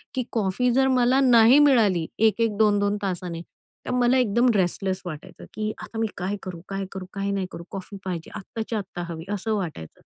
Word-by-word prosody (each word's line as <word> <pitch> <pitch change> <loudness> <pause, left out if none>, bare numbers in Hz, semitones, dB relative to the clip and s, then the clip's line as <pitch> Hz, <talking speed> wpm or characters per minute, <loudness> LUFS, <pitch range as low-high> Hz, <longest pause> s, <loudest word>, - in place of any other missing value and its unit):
की 255 - 0
कॉफी 225 +3 +1
जर 265 +1 +3
मला 255 0 +3
नाही 245 +1 +7
मिळाली 220 - +4
1-1 220 0 +2
2-2 205 -1 +3
तासांनी 175 -3 -3 0.4
तर - - -3
मला 250 +1 +3
एकदम 240 +1 +3
रेस्टलेस 190 0 0
वाटायचं, 155 -4 -8
की 215 0 -2
आता 225 - -8
मी 225 - +1
काय 190 +3 -2
करू? 180 -3 -7
काय 195 0 -3
करू? 190 -1 -6
काय 200 0 -2
नाही 195 -2 -1
करू, 170 - -8
कॉफी 195 +1 -7
पाहिजे 175 -3 -5
आत्ताच्या 220 +2 -4
आत्ता 180 -2 -6
हवी, 160 0 -7
असं 215 +2 -1
वाटायचं. 160 - -6
205 Hz, 185 wpm, -24 LUFS, 185-235 Hz, 0.4 s, नाही